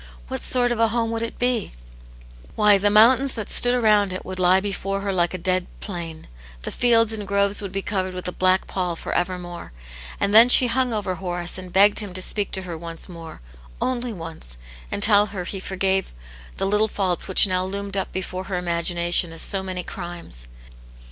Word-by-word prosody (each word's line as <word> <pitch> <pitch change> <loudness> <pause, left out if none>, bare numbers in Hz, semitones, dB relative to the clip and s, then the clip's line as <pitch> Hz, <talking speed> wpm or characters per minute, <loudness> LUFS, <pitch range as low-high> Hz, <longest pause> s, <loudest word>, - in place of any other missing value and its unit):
What - - -5
sort 245 -1 +1
of 240 - -2
a 230 - +4
hom^ 230 0 -1
would 225 0 -3
it 230 - -5
be 245 -3 -1 0.4
} - - -21
Why, 210 -2 +4
the 205 +1 +2
mountains 245 +6 +4
that 220 -4 -4
stood 245 0 +6
around 210 -5 +3
it 185 - -6
would 185 0 -7
lie 185 +1 +4
before 195 0 -4
her 200 -1 -2
like 175 -1 0
a - - -3
dead 185 0 -1
plain; 170 -5 -7 0.4
the - - -5
fields 230 -2 +2
and 210 -2 -4
groves 200 +1 +1
would 200 -2 -6
be 195 0 -4
covered 185 -2 -3
with 180 - -5
a - - -2
black 185 +1 +1
pall 180 -3 -3
for - - -6
evermore! 175 - -4 0.5
And 200 0 0
then 230 +3 +8
she 250 - +9
hung 250 +1 0
over 205 -4 -2
Horace 175 -1 -5
and 185 -1 -9
begged 200 +2 +5
him 205 -4 -5
to 185 - -1
speak 205 0 -1
to 190 - -2
her 175 -2 -6
once 165 0 -6
more, 165 - -11 0.4
only 250 -1 -2
once, 165 - -4 0.3
and 200 - -3
tell 205 -1 +5
her 195 -3 -6
he 195 +2 -6
forgave 190 - -1 0.4
the - - -1
little 210 +2 +2
faults 190 -4 -2
which 190 - +6
now 185 -2 -1
loomed 200 +1 -4
up 195 - -2
before 185 0 -5
her 195 -2 -3
imagination 175 0 0
as 165 - -2
so 195 -2 +1
many 185 -1 -5
crimes. 170 - -7
190 Hz, 205 wpm, -22 LUFS, 180-210 Hz, 0.5 s, she